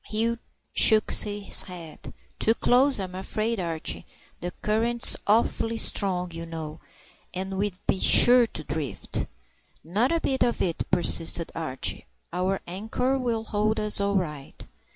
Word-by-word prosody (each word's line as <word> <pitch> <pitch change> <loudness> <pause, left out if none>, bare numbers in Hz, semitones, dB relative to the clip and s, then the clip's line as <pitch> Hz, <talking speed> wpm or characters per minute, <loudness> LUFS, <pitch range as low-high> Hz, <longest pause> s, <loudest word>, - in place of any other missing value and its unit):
Hugh 230 +2 0 0.3
shook 220 -1 +6
his 205 -1 0
head. 170 -4 -10 0.3
"Too 225 - +3
close, 260 +1 +3
I'm 185 -2 -5
afraid, 215 +4 -3
Archie. 165 -3 -2 0.3
The 175 - -4
current's 230 +3 +3
awfully 225 +1 +1
strong, 180 -5 -1
you 165 0 -7
know, 160 -2 -7 0.6
and 190 +1 -4
we'd 200 -2 -2
be 190 - 0
sure 245 +3 +7
to 155 - -8
drift." 150 -3 -4 0.6
"Not 210 - 0
a 335 - +1
bit 265 -4 -1
of 245 -1 +1
it," 170 -3 -2
persisted 170 -1 0
Archie. 145 -5 -2 0.3
"Our 185 +2 -1
anchor'll 230 +5 -2
hold 215 0 -1
us 210 -1 +2
all 200 0 0
right." 150 -7 -5
200 Hz, 135 wpm, -25 LUFS, 175-225 Hz, 0.6 s, sure